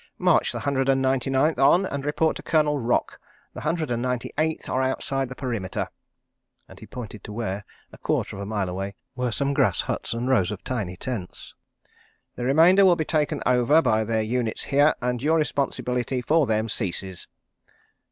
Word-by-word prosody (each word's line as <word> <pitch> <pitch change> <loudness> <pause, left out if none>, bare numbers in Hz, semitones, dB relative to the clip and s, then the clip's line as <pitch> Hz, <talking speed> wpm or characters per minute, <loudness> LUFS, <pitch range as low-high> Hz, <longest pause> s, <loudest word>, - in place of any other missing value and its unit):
"March - - +3
the - - -4
Hundred 135 -1 0
and 135 0 +4
Ninety 130 -1 +1
Ninth 135 +3 +2
on 160 +8 +5
and 140 -6 -4
report 150 +2 +1
to - - -7
Colonel 150 -2 +1
Rock. 120 0 0 0.3
The - - -7
Hundred 155 -3 -1
and 120 0 -1
Ninety 125 -1 -2
Eighth 160 +1 -1
are 130 - 0
outside 135 0 -1
the 130 - -7
perimeter," 115 -9 -3 0.8
and - - -14
he - - -12
pointed 110 -4 -8
to - - -8
where, 105 -2 -3 0.3
a - - -13
quarter - - -1
of 100 - -7
a - - -4
mile 105 -3 -1
away, 95 +2 -4 0.2
were 125 -1 -1
some 140 +4 -1
grass - - +2
huts - - -3
and 120 +2 -2
rows 120 -9 +3
of 105 -2 -6
tiny 100 -8 -3
tents. 110 -7 -6 0.8
"The 120 - -5
remainder 165 +9 +6
will 185 -2 +6
be 160 -2 -2
taken 150 -2 0
over 125 +5 +4
by 110 -8 +2
their 110 0 0
units 115 0 -2
here, 145 +2 +3
and 125 -1 -1
your 160 +4 +3
responsibility 125 -4 -1
for 155 +1 +3
them 110 0 +1
ceases." 95 -4 -4
130 Hz, 190 wpm, -25 LUFS, 110-145 Hz, 0.8 s, remainder